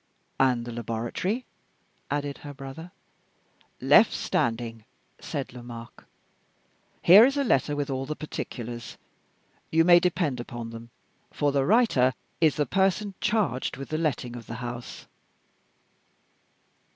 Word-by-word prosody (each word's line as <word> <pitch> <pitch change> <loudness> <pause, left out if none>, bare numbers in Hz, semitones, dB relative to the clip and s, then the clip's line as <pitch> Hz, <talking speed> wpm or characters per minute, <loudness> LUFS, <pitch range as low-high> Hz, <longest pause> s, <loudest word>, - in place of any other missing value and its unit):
"And 125 -3 +3
the 120 - -6
laboratory?" 120 - -3 0.6
added 145 -1 -2
her 145 -1 -9
brother. 135 +6 -9 0.9
"Left - - +6
standing," 115 -1 -1 0.4
said 135 -3 -5
Lomaque. 120 -1 -10 1.0
"Here 195 +6 +9
is 275 +3 +3
a 280 - +2
letter 145 - +2
with 145 -1 -2
all 135 0 -3
the 155 - -3
particulars. 120 -6 -6 0.7
You 165 +1 +4
may 175 0 +8
depend 170 -7 0
upon 120 -1 -6
them, 115 +1 -10 0.4
for 145 -1 0
the 135 -1 +1
writer 190 - +4 0.2
is 155 -3 +4
the 150 - +1
person 195 +2 +1
charged 200 - 0
with 135 - -7
the 155 - -1
letting 125 -6 -2
of 115 -3 -9
the 115 - -6
house." 120 0 -7
135 Hz, 125 wpm, -27 LUFS, 120-165 Hz, 1.0 s, Here